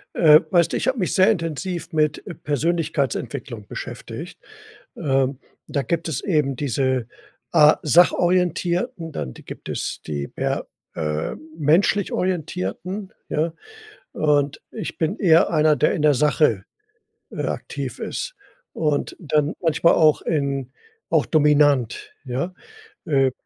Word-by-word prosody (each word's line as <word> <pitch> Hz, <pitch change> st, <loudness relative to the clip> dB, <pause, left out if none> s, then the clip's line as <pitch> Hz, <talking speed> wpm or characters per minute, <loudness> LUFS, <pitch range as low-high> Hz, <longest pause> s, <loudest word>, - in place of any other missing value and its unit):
Äh, 155 Hz, -1 st, +7 dB
weißt 170 Hz, -1 st, +3 dB
du, -, -, +1 dB
ich -, -, -2 dB
habe 260 Hz, 0 st, +1 dB
mich 180 Hz, -, 0 dB
sehr 190 Hz, -, +5 dB
intensiv 165 Hz, -, -2 dB
mit, 155 Hz, -2 st, 0 dB
äh, 185 Hz, -, -6 dB
Persönlichkeitsentwicklung 140 Hz, -7 st, -2 dB
beschäftigt. -, -, -8 dB, 0.6 s
Ähm, 135 Hz, -1 st, 0 dB, 0.3 s
da 140 Hz, -, -1 dB
gibt 165 Hz, +3 st, -2 dB
es 155 Hz, -, -3 dB
eben 150 Hz, -7 st, +1 dB
diese 130 Hz, -2 st, -1 dB, 0.4 s
A 150 Hz, +1 st, +6 dB
Sachorientierten, 175 Hz, +1 st, +2 dB
dann 70 Hz, -, -4 dB
di -, -, -14 dB
gibt -, -, -9 dB
es -, -, -4 dB
die 70 Hz, -2 st, -3 dB
per -, -, -2 dB, 0.3 s
äh, 75 Hz, -2 st, -2 dB, 0.2 s
menschlich 165 Hz, +6 st, +2 dB
Orientierten, 180 Hz, -, -3 dB, 0.2 s
ja? 160 Hz, +2 st, 0 dB, 0.6 s
Und 145 Hz, -2 st, +1 dB
ich 220 Hz, -, -6 dB
bin 165 Hz, +6 st, -1 dB
eher 165 Hz, -5 st, +5 dB
einer, 155 Hz, -2 st, +3 dB
der 150 Hz, +3 st, +2 dB
in 150 Hz, -, -2 dB
der 150 Hz, -1 st, +5 dB
Sache, 145 Hz, -7 st, +2 dB, 0.7 s
äh, -, -, -4 dB
aktiv -, -, -5 dB
ist -, -, -4 dB, 0.4 s
und 150 Hz, -3 st, -1 dB
dann 150 Hz, -2 st, 0 dB
manchmal 165 Hz, 0 st, +3 dB
auch 155 Hz, -2 st, +4 dB
in 140 Hz, -4 st, -1 dB, 0.4 s
auch -, -, +3 dB
dominant, 145 Hz, -5 st, +2 dB
ja? 135 Hz, +8 st, -3 dB, 0.5 s
Äh, 135 Hz, -3 st, +2 dB
150 Hz, 130 wpm, -22 LUFS, 135-170 Hz, 0.7 s, Äh